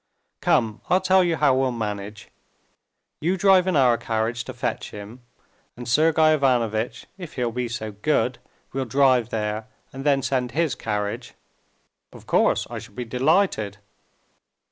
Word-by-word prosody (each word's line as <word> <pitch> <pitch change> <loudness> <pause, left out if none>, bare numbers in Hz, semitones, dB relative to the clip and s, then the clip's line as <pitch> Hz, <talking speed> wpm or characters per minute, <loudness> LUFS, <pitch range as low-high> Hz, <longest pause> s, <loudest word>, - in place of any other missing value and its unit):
"Come, 110 -2 +1
I'll 185 - +4
tell 190 0 +4
you 170 -2 +1
how 145 -3 +3
we'll 130 -1 +1
manage: 105 -3 -5 0.9
you 175 +5 0
drive 190 -1 +5
in 185 - +1
our 125 -5 +4
carriage 115 +1 -2
to - - -6
fetch - - -3
him, 105 +4 -10 0.6
and 120 - -8
Sergey 155 +4 +4
Ivanovitch, 120 -6 0
if 175 -3 -8
he'll 125 -3 -1
be 125 +1 -2
so 115 -2 -5
good, 105 0 0 0.3
will 135 0 -2
drive 130 -1 +3
there 110 -1 -3 0.3
and 135 +1 -7
then 140 -2 +2
send 125 -1 -1
his 160 -3 +1
carriage." 105 -3 -4 0.8
"Of - - -14
course; - - +2
I - - -6
shall - - -13
be 125 0 -4
delighted." 125 - +1
125 Hz, 150 wpm, -24 LUFS, 110-150 Hz, 0.9 s, drive